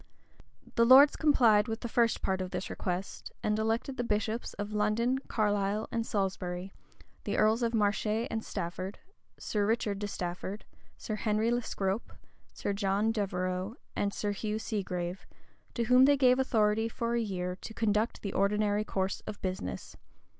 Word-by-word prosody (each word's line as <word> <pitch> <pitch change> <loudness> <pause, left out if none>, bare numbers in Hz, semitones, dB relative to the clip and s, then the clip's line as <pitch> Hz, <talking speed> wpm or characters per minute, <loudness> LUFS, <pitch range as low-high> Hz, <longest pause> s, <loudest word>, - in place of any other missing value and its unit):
The 230 - +4
lords 265 +4 +8
complied 230 -9 +4
with 225 0 -4
the - - -3
first 230 0 +1
part 190 0 0
of 185 - -3
this 180 0 -4
request, 180 +1 -4
and 210 0 +1
elected 225 +5 -1
the 245 - 0
bishops 220 +1 -2
of 205 +1 -5
London, 220 +5 +1
Carlisle, 205 -1 0
and 230 -1 -2
Salisbury, 190 -2 -2 0.5
the - - -2
earls 220 +3 +3
of 230 -1 0
Marche 210 0 +1 0.2
and 225 0 -2
Stafford, 185 +1 -5 0.4
Sir 210 -2 -1
Richard 215 -3 0
de 205 - -2
Stafford, 185 +2 -5 0.3
Sir 215 - -4
Henry 215 +2 +1
le 240 0 +1
Scrope, 195 -1 -3 0.4
Sir 200 - -3
John 200 +2 +1
Devereux, 185 -1 -2 0.2
and 200 - 0
Sir 205 0 -2
Hugh 210 +1 -2
Segrave, 185 -5 -4 0.5
to 235 - 0
whom 250 +3 +6
they 285 0 +5
gave 255 -1 +4
authority 220 -3 +2
for 235 0 -2
a 235 - +1
year 180 -4 -3
to 220 - -9
conduct 215 +1 0
the 200 - -3
ordinary 210 +1 +2
course 190 -2 -2
of 215 -1 -6
business. 185 - -4
210 Hz, 160 wpm, -30 LUFS, 195-230 Hz, 0.5 s, lords